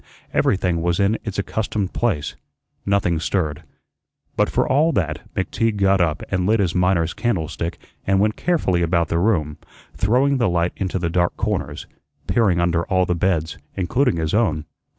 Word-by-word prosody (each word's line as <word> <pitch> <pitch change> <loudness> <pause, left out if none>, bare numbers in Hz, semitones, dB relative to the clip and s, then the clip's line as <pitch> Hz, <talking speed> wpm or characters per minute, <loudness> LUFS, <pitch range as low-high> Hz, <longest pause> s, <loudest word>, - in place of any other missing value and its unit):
Everything 90 -4 +1
was 85 0 0
in 100 +3 +2
its 105 -3 -5
accustomed 100 0 -2
place; 80 -12 -1 0.5
nothing 100 -5 +2
stirred. 80 -4 -1 0.7
But - - +2
for - - +1
all 150 +5 +3
that 75 -4 -1
McTeague 110 +3 0
got 95 -1 +3
up 80 -3 0
and 90 -1 0
lit 110 +1 +3
his 90 -4 +1
miner's 90 -2 +2
candlestick 85 -6 -2 0.3
and 95 0 +3
went 105 +1 +2
carefully 125 - +1
about 85 -1 +1
the 85 - +1
room, 80 -7 0 0.3
throwing 130 +7 +2
the 120 - +2
light 85 0 0
into 95 -1 -2
the 85 -2 -2
dark 85 0 +1
corners, 95 -9 -2 0.4
peering 100 -7 +2
under 85 -1 +1
all 95 0 +2
the 90 - 0
beds, 85 -3 -1 0.2
including 115 +5 +1
his 80 +1 -2
own. 85 -9 +1
90 Hz, 165 wpm, -21 LUFS, 85-105 Hz, 0.7 s, all